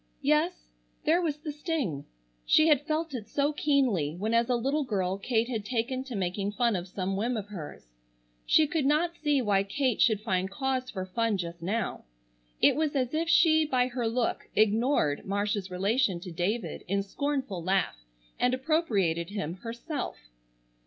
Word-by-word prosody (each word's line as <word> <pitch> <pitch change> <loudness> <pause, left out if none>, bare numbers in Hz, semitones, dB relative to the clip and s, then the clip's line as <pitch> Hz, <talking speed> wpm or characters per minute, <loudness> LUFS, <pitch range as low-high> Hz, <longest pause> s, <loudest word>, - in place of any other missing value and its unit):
Yes, 300 +5 +1 0.3
there 330 +4 +4
was 310 -4 -1
the 300 0 -5
sting. 290 - -3 0.4
She 310 +1 +5
had 295 0 +3
felt 315 0 -1
it 230 -4 -6
so 290 +1 +1
keenly 250 - +1
when 215 +5 -2
as 230 +1 +3
a 250 - +3
little 275 +6 0
girl 195 -6 -1
Kate 230 +2 +1
had 225 -4 -3
taken 250 +3 -2
to 255 -4 -6
making 195 +2 -2
fun 235 0 +2
of 180 0 -3
some 190 +1 -3
whim 230 +4 -1
of 205 -1 -5
hers. 170 - -8 0.6
She 315 - +5
could 295 -2 0
not 330 +4 +2
see 295 -5 +1
why 200 -3 +3
Kate 245 +4 0
should 215 -3 +4
find 190 -3 -1
cause 260 +3 -2
for 185 -2 -4
fun 225 +2 0
just 170 -1 -5
now. 205 - -2 0.5
It - - +5
was 305 -1 0
as 255 -1 0
if 325 +2 0
she 315 -2 +5
by 255 -4 +1
her 245 -2 -2
look 230 +1 -1
ignored 215 - +2
Marcia's 200 0 -1
relation 195 +2 +1
to 180 - -7
David 185 +8 -2
in 200 +2 0
scornful 265 -3 -2
laugh 180 - 0 0.4
and 250 +1 +3
appropriated 215 - 0
him 195 -4 -4
herself. 235 - -5
230 Hz, 175 wpm, -28 LUFS, 195-285 Hz, 0.6 s, She